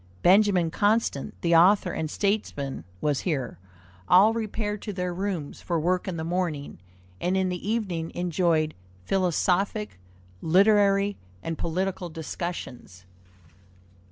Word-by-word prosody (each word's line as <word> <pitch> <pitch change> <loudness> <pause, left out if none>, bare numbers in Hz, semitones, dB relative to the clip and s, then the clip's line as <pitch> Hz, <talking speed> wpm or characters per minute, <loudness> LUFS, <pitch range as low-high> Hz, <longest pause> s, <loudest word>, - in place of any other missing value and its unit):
Benjamin 185 -3 +4
Constant, 205 -7 0
the 170 -1 +3
author 180 +2 +5
and 160 -2 -3
statesman, 150 - -2 0.2
was 145 -3 +1
here. 145 - -3 0.5
All 195 +6 +6
repaired 215 -2 -3
to 210 - -5
their 180 -1 -2
rooms 185 -5 -4
for 170 -2 -1
work 180 +4 0
in 180 -3 -3
the 160 - -3
morning, 165 - -3 0.4
and 185 +2 0
in 190 -1 +1
the 180 +3 -4
evening 185 -8 -2
enjoyed 170 -3 +1 0.3
philosophic, 190 - 0 0.4
literary, 200 +2 +4 0.3
and 165 - -3
political 180 +2 -2
discussions. 155 - -6
180 Hz, 120 wpm, -26 LUFS, 160-200 Hz, 0.5 s, All